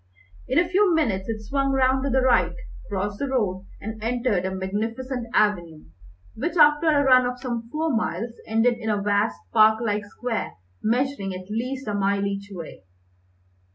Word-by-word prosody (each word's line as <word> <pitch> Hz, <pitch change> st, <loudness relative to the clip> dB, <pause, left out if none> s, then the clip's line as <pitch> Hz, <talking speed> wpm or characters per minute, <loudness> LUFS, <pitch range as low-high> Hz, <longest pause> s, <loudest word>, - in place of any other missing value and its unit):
In 260 Hz, -, 0 dB
a 345 Hz, +1 st, +4 dB
few 370 Hz, 0 st, +3 dB
minutes 210 Hz, -11 st, 0 dB
it 220 Hz, -1 st, -4 dB
swung 275 Hz, +4 st, 0 dB
round 265 Hz, 0 st, +2 dB
to 280 Hz, -, 0 dB
the 260 Hz, 0 st, +2 dB
right, 255 Hz, -2 st, +3 dB, 0.3 s
crossed 205 Hz, +1 st, -3 dB
the 280 Hz, -, -1 dB
road, 195 Hz, -8 st, -1 dB
and 220 Hz, +1 st, -7 dB
entered 230 Hz, -5 st, 0 dB
a -, -, 0 dB
magnificent 230 Hz, +6 st, -3 dB
avenue, 175 Hz, -8 st, +1 dB, 0.5 s
which, 335 Hz, +10 st, -3 dB
after 300 Hz, +1 st, +5 dB
a 290 Hz, -2 st, +4 dB
run 255 Hz, -2 st, +5 dB
of 250 Hz, 0 st, -5 dB
some 235 Hz, -3 st, -4 dB
four 310 Hz, 0 st, -1 dB
miles, 225 Hz, +1 st, -2 dB
ended 230 Hz, +2 st, +2 dB
in 220 Hz, -1 st, -3 dB
a 210 Hz, -1 st, +1 dB
vast, 205 Hz, +2 st, 0 dB
park 220 Hz, 0 st, +6 dB
like 210 Hz, -3 st, -1 dB
square, 230 Hz, +2 st, -4 dB, 0.3 s
measuring 235 Hz, -4 st, -1 dB
at 185 Hz, +2 st, -9 dB
least 255 Hz, +3 st, -3 dB
a 210 Hz, -, -1 dB
mile 200 Hz, 0 st, +1 dB
each 200 Hz, 0 st, -4 dB
way. 170 Hz, -, -9 dB
230 Hz, 175 wpm, -24 LUFS, 205-260 Hz, 0.5 s, park